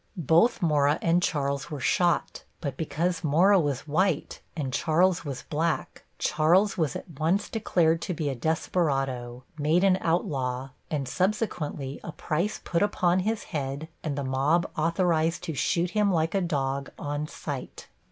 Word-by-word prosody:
Both 170 - +3
Mora 150 -2 +3
and 170 +1 +3
Charles 140 -5 -1
were 150 - -5
shot, 175 +5 +1 0.2
but 140 -5 -4
because 170 +4 -1
Mora 180 +7 +5
was 145 -3 -2
white 165 +1 0 0.2
and 135 -4 -3
Charles 170 +6 +2
was 140 -4 -5
black, 160 +1 -2
Charles 175 +7 +3
was 155 -6 0
at 160 -6 -8
once 175 +6 +1
declared 170 -7 +1
to 180 - -2
be 155 -2 -2
a 140 - 0
desperado, 135 -4 -1 0.2
made 155 +5 +3
an 190 -1 +4
outlaw, 135 -7 -1 0.2
and 140 -4 -2
subsequently 180 - -2
a 170 - -5
price 175 +8 -2
put 170 - 0
upon 185 -3 +2
his 215 +3 -1
head 140 +1 -3
and 145 -3 -2
the 140 - -1
mob 140 +7 +1
authorized 165 0 +1
to 160 - -3
shoot 170 +6 0
him 210 -2 +2
like 165 -2 +1
a 195 - +2
dog, 140 -5 -1
on 145 +1 -3
sight. - - -7
160 Hz, 155 wpm, -27 LUFS, 140-180 Hz, 0.2 s, Mora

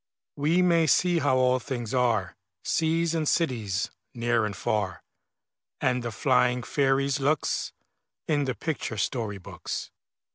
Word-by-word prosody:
We 160 +5 +2
may 170 -2 +4
see 175 +3 +3
how 140 -3 +2
all 130 0 +3
things 120 -3 -5
are, 115 -7 +1 0.3
Seas 165 0 +1
and 160 -2 0
cities, 110 - 0 0.2
near 120 -1 +1
and 100 - -6
far, 95 -6 -2 0.8
And 125 0 +1
the 120 - -3
flying 125 +4 +2
fairies' 135 +1 +1
looks, 145 +2 0 0.6
In 145 -3 +1
the 130 -2 -2
picture 150 -7 -3
story 105 0 -2
books. 90 - -6
130 Hz, 135 wpm, -27 LUFS, 115-155 Hz, 0.8 s, may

